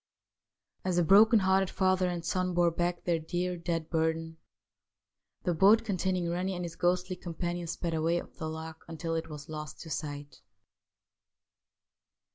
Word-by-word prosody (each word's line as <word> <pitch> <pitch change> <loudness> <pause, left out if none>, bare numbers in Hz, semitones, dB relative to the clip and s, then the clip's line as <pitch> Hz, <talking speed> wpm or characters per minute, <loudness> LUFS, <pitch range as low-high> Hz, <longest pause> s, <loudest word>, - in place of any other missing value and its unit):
As 185 -1 0
the 175 - +4
broken 215 +7 +7
hearted 190 -1 +3
father 185 -1 +2
and 170 -1 -4
son 185 +1 0
bore 175 -1 +4
back 175 +1 -1
their 170 -2 +1
dear, 180 +3 -2
dead 170 -2 -3
burden, 160 0 0 1.1
the 180 - +1
boat 205 +7 +5
containing 185 -3 0
Rennie 180 +2 -1
and 175 0 -3
his 170 - -7
ghostly 180 +1 +1
com 175 -2 -8
panion 175 0 -3
sped 170 0 -3
away 165 +2 +1
up - - -11
the 160 - -5
loch 160 0 -7
until 165 0 -4
it 165 0 -2
was 150 0 -8
lost 150 -2 -7
to 160 - -9
sight. 145 -3 -5
175 Hz, 160 wpm, -30 LUFS, 160-185 Hz, 1.1 s, broken